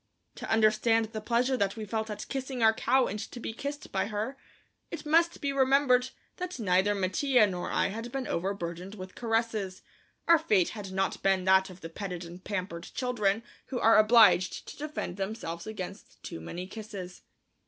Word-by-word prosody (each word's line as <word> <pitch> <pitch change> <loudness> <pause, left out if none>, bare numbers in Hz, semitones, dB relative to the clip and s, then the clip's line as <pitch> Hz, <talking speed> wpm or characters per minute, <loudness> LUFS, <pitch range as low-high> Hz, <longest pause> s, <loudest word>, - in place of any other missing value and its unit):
To - - -7
understand 220 +1 +3
the 215 - -4
pleasure 245 +4 +1
that 200 -5 0
we 215 - -4
felt 220 +1 -2
at 210 - -6
kissing 265 -3 -3
our 220 0 +6
cow 255 +3 +3
and 210 - -4
to 230 +3 -7
be 225 - -5
kissed 285 +5 -6
by 190 +1 0
her, 215 +5 -3 0.5
it - - -7
must 330 +3 +3
be 280 -1 -1
remembered 265 -2 +4 0.3
that 360 -3 -4
neither 195 0 +2
Mattia 215 +6 +3
nor 180 -3 -3
I - - +1
had 225 +4 -6
been 270 0 -3
overburdened 180 0 -3
with 185 -2 -9
caresses; 225 -5 -1 0.4
our 335 -1 +7
fate 210 - +2
had 205 -3 -7
not 190 0 -1
been 195 -1 +2
that 190 +1 +4
of 185 0 -12
the 165 - -7
petted 180 -1 -5
and 175 +2 -11
pampered 185 -4 -4
children 225 -4 0 0.2
who 255 -2 -3
are 225 -1 +6
obliged 215 -5 +5
to - - -9
defend 295 - -5
themselves 195 -3 -4
against 210 -5 -8
too - - -6
many 175 - -6
kisses. 200 -3 -8
215 Hz, 180 wpm, -29 LUFS, 190-245 Hz, 0.5 s, our